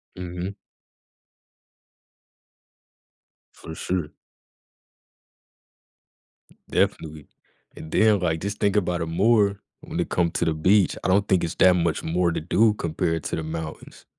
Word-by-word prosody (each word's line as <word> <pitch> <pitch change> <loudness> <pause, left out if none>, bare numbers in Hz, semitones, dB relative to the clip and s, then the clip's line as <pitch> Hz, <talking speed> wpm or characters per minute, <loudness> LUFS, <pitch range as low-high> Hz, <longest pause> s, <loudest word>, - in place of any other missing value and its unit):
Mhm. 90 +2 -6 3.0
For 80 - -10
sure. 90 -4 -2 2.6
Definitely, 75 -2 -1 0.5
and 80 - -10
then 110 -2 +4
like 80 -3 -1
just 100 +2 -4
think 100 -1 +1
about 90 -4 0
it - - -1
more 100 +4 +2 0.2
when - - -6
it - - -1
come 85 -2 +1
to - - -1
the 80 - +1
beach. 95 +5 +3
I - - -1
don't 100 +2 +2
think 95 -2 +2
it's 85 - -3
that 90 -1 +5
much 85 -3 0
more 85 +1 +1
to - - -3
do 105 +7 +3
compared 80 -3 -2
to - - -2
the 80 - -4
mountains. 80 0 -7
90 Hz, 130 wpm, -24 LUFS, 80-100 Hz, 3.0 s, that